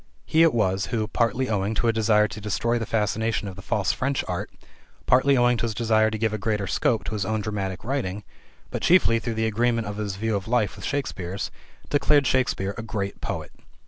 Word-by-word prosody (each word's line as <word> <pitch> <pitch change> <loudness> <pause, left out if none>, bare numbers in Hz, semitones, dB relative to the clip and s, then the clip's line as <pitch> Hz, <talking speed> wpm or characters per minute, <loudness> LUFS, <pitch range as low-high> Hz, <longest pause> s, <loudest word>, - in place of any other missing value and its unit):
He 160 - +3
it 165 -1 +6
was 95 -5 +1
who, 110 -2 -1
partly 120 +3 0
owing 105 -1 -1
to 115 - +1
a 115 - +3
desire 105 -1 +3
to 105 - -8
destroy 110 +4 0
the 115 - -4
fascination 110 0 0
of 95 - -7
the 95 - -9
false 100 0 0
French 135 +1 -1
art, - - -3 0.6
partly 135 +2 +4
owing 120 0 +4
to 115 - -1
his 110 - -4
desire 110 -1 +3
to 110 - -3
give 110 0 0
a 110 - -2
greater 105 -1 -1
scope 110 +4 +1
to - - -5
his 105 -2 -1
own 110 +2 -1
dramatic 100 -3 -3
writing, 105 -6 -2 0.5
but - - -3
chiefly 140 -10 +4
through 115 -1 -3
the 110 0 0
agreement 115 +1 +1
of 105 0 -5
his 105 -2 -3
view 110 +2 -1
of 100 -1 -3
life 115 -4 +1
with - - -8
Shakespeare's, 100 -9 -3 0.4
declared 145 0 +4
Shakespeare 115 -6 +1
a - - -2
great 105 -3 -4
poet. - - -4
110 Hz, 215 wpm, -25 LUFS, 100-120 Hz, 0.6 s, it